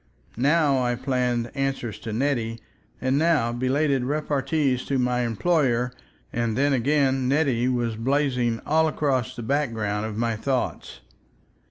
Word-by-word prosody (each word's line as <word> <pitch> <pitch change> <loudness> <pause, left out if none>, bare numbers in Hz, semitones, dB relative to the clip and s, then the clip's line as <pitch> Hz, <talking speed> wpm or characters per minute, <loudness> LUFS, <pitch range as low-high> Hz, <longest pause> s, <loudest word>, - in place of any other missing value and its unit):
Now 140 +1 +3
I 120 -1 0
planned 125 -2 -1
answers 135 -6 -2
to 115 - -6
Nettie 115 -2 -1 0.4
and 130 +2 +1
now 155 -8 +2
belated 135 +2 +1
repartees 140 -1 0
to 140 - 0
my 125 -1 +1
employer, 125 - +1 0.4
and 115 -1 -1
then 140 +1 +3
again 135 0 +2
"Nettie" 135 -4 +2
was 120 -3 -1
blazing 125 -2 0
all 160 +1 +3
across 135 -6 -1
the 120 - -6
background 110 -6 -1
of 105 -1 -6
my 115 0 0
thoughts. 125 - -3
130 Hz, 135 wpm, -24 LUFS, 120-140 Hz, 0.4 s, Now